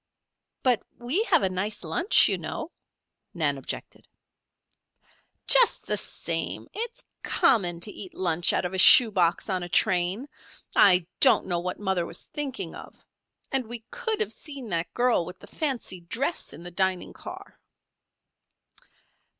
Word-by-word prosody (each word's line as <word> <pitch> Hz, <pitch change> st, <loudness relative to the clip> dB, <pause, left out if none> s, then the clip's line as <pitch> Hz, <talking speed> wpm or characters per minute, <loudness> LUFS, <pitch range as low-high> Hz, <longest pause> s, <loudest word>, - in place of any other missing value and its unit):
"But 250 Hz, -5 st, +2 dB, 0.2 s
we 250 Hz, -, 0 dB
have -, -, +3 dB
a 190 Hz, -, +3 dB
nice 190 Hz, +3 st, -3 dB
lunch, 165 Hz, -, +4 dB
you -, -, +1 dB
know," -, -, -6 dB, 0.6 s
Nan 150 Hz, -4 st, +1 dB
objected. -, -, -8 dB, 1.4 s
"Just -, -, +5 dB
the -, -, 0 dB
same, -, -, -3 dB
it's 470 Hz, +2 st, -5 dB, 0.2 s
common 200 Hz, -, +2 dB
to 210 Hz, -, 0 dB
eat 190 Hz, -3 st, -8 dB
lunch 175 Hz, -2 st, +1 dB
out -, -, 0 dB
of 180 Hz, -, -4 dB
a 190 Hz, -, -2 dB
shoe 230 Hz, +3 st, +8 dB
box 175 Hz, -4 st, +1 dB
on 185 Hz, -3 st, -1 dB
a 175 Hz, -, -6 dB
train. 185 Hz, +6 st, +1 dB, 0.5 s
I 180 Hz, -3 st, +5 dB
don't -, -, +5 dB
know 175 Hz, -2 st, -1 dB
what 180 Hz, +1 st, -5 dB
mother 190 Hz, -4 st, -1 dB
was 170 Hz, -, -8 dB
thinking 280 Hz, -3 st, -4 dB
of. -, -, -13 dB, 0.5 s
And 265 Hz, -4 st, -1 dB
we 230 Hz, -1 st, -7 dB
could 465 Hz, -3 st, -2 dB
have 440 Hz, -, 0 dB
seen 275 Hz, -7 st, -7 dB
that 165 Hz, -2 st, -2 dB
girl 245 Hz, -6 st, +2 dB
with 180 Hz, +2 st, -9 dB
the -, -, -14 dB
fancy 265 Hz, -, -3 dB
dress 255 Hz, -, -2 dB
in 170 Hz, -, -10 dB
the 175 Hz, -, -8 dB
dining 190 Hz, 0 st, -1 dB
car." -, -, -11 dB
190 Hz, 150 wpm, -26 LUFS, 175-260 Hz, 1.4 s, shoe